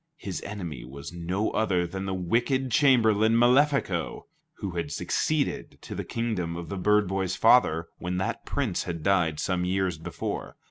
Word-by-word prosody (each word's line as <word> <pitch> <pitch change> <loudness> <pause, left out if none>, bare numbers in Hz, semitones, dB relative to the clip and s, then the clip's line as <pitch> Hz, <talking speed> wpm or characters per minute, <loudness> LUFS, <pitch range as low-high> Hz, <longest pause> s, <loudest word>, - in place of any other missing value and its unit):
His 95 - -5
enemy 90 -11 -6
was 70 +6 -9
no 90 +5 -1
other 95 -5 +1
than 95 +3 -5
the 95 - -1
wicked 120 +8 0
chamberlain 110 -5 +4
Malefico, 125 - +2 0.3
who 100 - -5
had 85 -3 -3
succeeded 155 -3 -1
to - - -7
the - - -4
kingdom 105 -8 -2
of 85 -2 -7
the 100 - -4
bird 105 +2 +3
boy's 95 -1 -1
father, 90 -8 +4
when 90 +1 -3
that 95 - -2
Prince 130 -10 -2
had 85 -3 -5
died 85 -5 +2
some 90 -1 0
years 90 -2 0
before. 85 +1 -5
95 Hz, 160 wpm, -27 LUFS, 85-110 Hz, 0.3 s, chamberlain